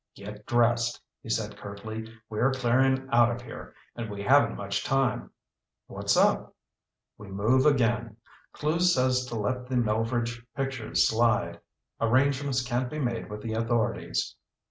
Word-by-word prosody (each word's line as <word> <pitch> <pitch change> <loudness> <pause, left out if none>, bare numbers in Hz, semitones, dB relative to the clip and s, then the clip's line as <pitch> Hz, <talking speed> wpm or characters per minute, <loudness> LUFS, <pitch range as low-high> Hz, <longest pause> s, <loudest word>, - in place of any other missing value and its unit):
"Get 105 +1 -10
dressed!" 120 0 +2 0.2
he - - -11
said 110 -2 -1
curtly. 110 +2 -7 0.2
"We're 115 +5 +1
clearing 130 +1 +2
out 120 -1 +5
of 120 0 -3
here. 115 - -10 0.2
And 115 -2 -5
we 100 -1 -6
haven't 140 +6 +4
much 100 0 -3
time." 135 -2 0 0.6
"What's - - -1
up?" - - +2 0.6
"We 105 - -10
move 110 +8 +2
again. 115 -5 +1 0.3
Clewes 170 +4 +1
says 130 -1 +2
to 120 - -5
let 125 +4 -2
the 130 - -3
Melveredge 115 +1 0
pictures 135 -4 0
slide. 115 +1 +1 0.4
Arrangements 130 +2 +2
can't 120 +1 -1
be 155 - -6
made 120 -7 -2
with 105 0 -7
the 110 - -3
authorities." 115 0 -1
120 Hz, 145 wpm, -27 LUFS, 110-130 Hz, 0.6 s, out